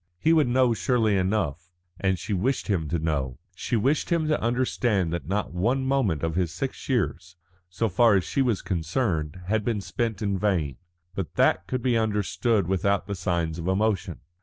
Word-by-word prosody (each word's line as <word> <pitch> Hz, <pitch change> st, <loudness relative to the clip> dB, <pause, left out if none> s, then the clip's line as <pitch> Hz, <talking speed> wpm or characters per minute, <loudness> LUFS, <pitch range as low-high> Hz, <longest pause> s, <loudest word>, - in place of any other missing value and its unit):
He 160 Hz, -, +3 dB
would 155 Hz, -5 st, +4 dB
know 125 Hz, 0 st, +3 dB
surely 110 Hz, +2 st, +1 dB
enough, 90 Hz, -4 st, -1 dB, 0.3 s
and 95 Hz, -1 st, +1 dB
she 100 Hz, -, -4 dB
wished 120 Hz, +8 st, 0 dB
him 85 Hz, -7 st, 0 dB
to 85 Hz, -, 0 dB
know; 70 Hz, -6 st, -2 dB, 0.2 s
she 95 Hz, +7 st, -2 dB
wished 135 Hz, +7 st, +1 dB
him 165 Hz, -2 st, +2 dB
to 150 Hz, -, +1 dB
understand 120 Hz, -7 st, 0 dB
that 85 Hz, -, -4 dB
not 100 Hz, +1 st, -2 dB
one 120 Hz, +9 st, 0 dB
moment 130 Hz, -, +1 dB
of 80 Hz, -1 st, 0 dB
his 90 Hz, -1 st, 0 dB
six 130 Hz, +12 st, -5 dB
years, 90 Hz, -8 st, -1 dB, 0.3 s
so 100 Hz, +6 st, -1 dB
far 110 Hz, +2 st, +4 dB
as 95 Hz, -, +2 dB
she 95 Hz, +9 st, -1 dB
was 120 Hz, -7 st, +1 dB
concerned, 85 Hz, -, -1 dB
had 105 Hz, +3 st, 0 dB
been 110 Hz, -1 st, 0 dB
spent 110 Hz, +2 st, -3 dB
in 100 Hz, -2 st, 0 dB
vain. 85 Hz, -10 st, 0 dB, 0.4 s
But -, -, -5 dB
that 90 Hz, -, +2 dB
could 125 Hz, +1 st, -2 dB
be 120 Hz, -3 st, +2 dB
understood 110 Hz, 0 st, +1 dB
without 95 Hz, +2 st, +1 dB
the 100 Hz, -, -4 dB
signs 85 Hz, -3 st, -1 dB
of 85 Hz, -, -4 dB
emotion. 95 Hz, -, 0 dB
100 Hz, 185 wpm, -26 LUFS, 85-120 Hz, 0.4 s, would